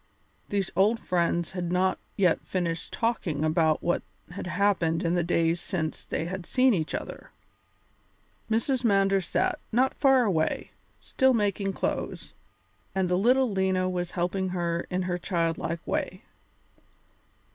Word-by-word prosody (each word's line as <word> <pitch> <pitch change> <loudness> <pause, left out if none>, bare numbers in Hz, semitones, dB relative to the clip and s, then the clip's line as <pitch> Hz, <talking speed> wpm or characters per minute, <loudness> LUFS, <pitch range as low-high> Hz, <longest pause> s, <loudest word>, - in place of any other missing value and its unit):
These 200 -2 -1
old 210 +5 +3
friends 170 -3 0
had 180 -2 -3
not 185 +1 +1 0.2
yet 180 -5 +3
finished 170 -2 -3
talking 195 -10 -1
about 155 0 +2
what 175 - +1 0.3
had 180 0 -6
happened 180 -3 +1
in 170 0 +1
the 175 -1 +2
days 165 0 +1
since 160 -5 -3
they 160 - -2
had 185 0 -5
seen 255 -1 +4
each 160 -5 -1
other. - - -7 1.2
Mrs. 240 +4 +1
Mander 195 -3 +3
sat, 175 - 0
not 255 +4 +2
far 270 -3 +4
away, 165 -8 0 0.3
still 265 -1 +2
making 200 -2 0
clothes, - - -3 0.6
and 190 -2 +1
the 180 - +2
little 250 +5 +3
Lena 190 -1 +1
was 180 -1 -2
helping 185 +2 0
her 170 -2 -2
in 185 0 -1
her 180 -1 -2
childlike 170 -1 -2
way. - - -3
185 Hz, 140 wpm, -27 LUFS, 170-200 Hz, 1.2 s, seen